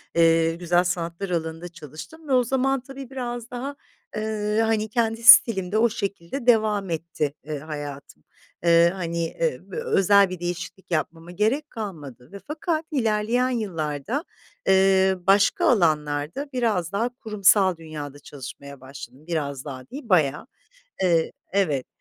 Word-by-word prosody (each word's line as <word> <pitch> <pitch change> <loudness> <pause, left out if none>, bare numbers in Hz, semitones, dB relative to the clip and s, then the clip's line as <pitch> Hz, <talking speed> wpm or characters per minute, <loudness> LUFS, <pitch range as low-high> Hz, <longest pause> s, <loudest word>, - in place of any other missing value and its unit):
eee, 165 0 +4
güzel 175 +1 +2
sanatlar 175 +1 -3
alanında 165 0 -3
çalıştım 170 - -11
ve 275 - 0
o 250 -1 +5
zaman, 265 +2 +1
tabii, 270 0 -10
biraz 240 -3 -5
daha, 265 +3 -5 0.4
eee, 215 0 -1
hani, 220 -1 0
kendi 225 +1 -1
stilimde 215 -5 +7
o 235 +2 +4
şekilde 200 +2 -5
devam 215 -4 +3
etti, 160 -3 -2
eee, 150 -1 -5
hayatım. 145 -2 -8 0.4
Eee, 170 0 +5
hani, 170 -2 -2
eee, 485 - -2
v - - -11
özel 200 - +4
bir 185 -1 -6
değişiklik 175 +2 -6
yapmama 165 +1 -3
gerek 230 - 0
kalmadı 150 - -8
ve 200 - -9
fakat 315 +1 -2
ilerleyen 235 -1 +1
yıllarda, 195 - -3 0.4
eee, 190 0 +4
başka 200 +1 +4
alanlarda 155 - +1
biraz 215 -9 0
daha 225 +5 0
kurumsal 200 -5 +3
dünyada 150 -3 -8
çalışmaya 140 0 -10
başladım. 135 +2 -11
Biraz 145 -5 -3
daha 130 -3 -8
değil 260 -1 -9
bayağı. 150 - +2 0.6
E, 165 -3 +2 0.2
evet, 155 -10 +1
190 Hz, 135 wpm, -24 LUFS, 160-225 Hz, 0.6 s, stilimde